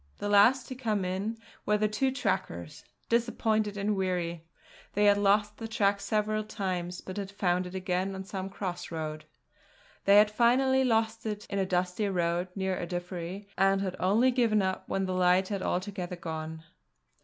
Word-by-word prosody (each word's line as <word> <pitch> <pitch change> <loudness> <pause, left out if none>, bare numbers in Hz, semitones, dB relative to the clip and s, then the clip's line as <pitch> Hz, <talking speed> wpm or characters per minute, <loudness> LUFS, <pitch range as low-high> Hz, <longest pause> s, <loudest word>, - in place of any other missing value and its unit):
The 205 - -3
last 230 +6 +5
to - - -4
come 220 -7 -1
in 195 +5 -2 0.3
were 210 0 +2
the 215 0 +2
two 215 +6 +1
trackers, 265 - -3 0.2
disappointed 220 -3 +1
and 205 +1 0
weary. 175 -3 -2 0.5
They 205 +1 +3
had 205 0 +5
lost 205 +1 +2
the 225 - -5
track 200 -2 +1
several 215 0 0
times; 185 -4 -3
but 185 - -8
had 200 -1 -3
found 180 -2 0
it 180 - -9
again 185 +1 -1
on 190 - -5
some 190 0 -5
cross 180 -3 -5
road. 155 -2 -5 0.8
They 200 - +6
had 210 0 +6
finally 260 +4 +3
lost 225 -2 +1
it 210 -1 -4
in 200 - 0
a 190 - 0
dusty 180 +3 0
road 175 -1 0
near 190 -1 -1
Ardiffery 175 +2 -5
and 195 +1 +3
had 190 -2 -2
only 220 +8 +3
given 230 -5 +2
up 190 0 -3
when 195 0 0
the 185 - -2
light 185 +1 +3
had 200 -2 -2
altogether 185 -1 -2
gone. 160 -2 -6
195 Hz, 175 wpm, -29 LUFS, 180-215 Hz, 0.8 s, They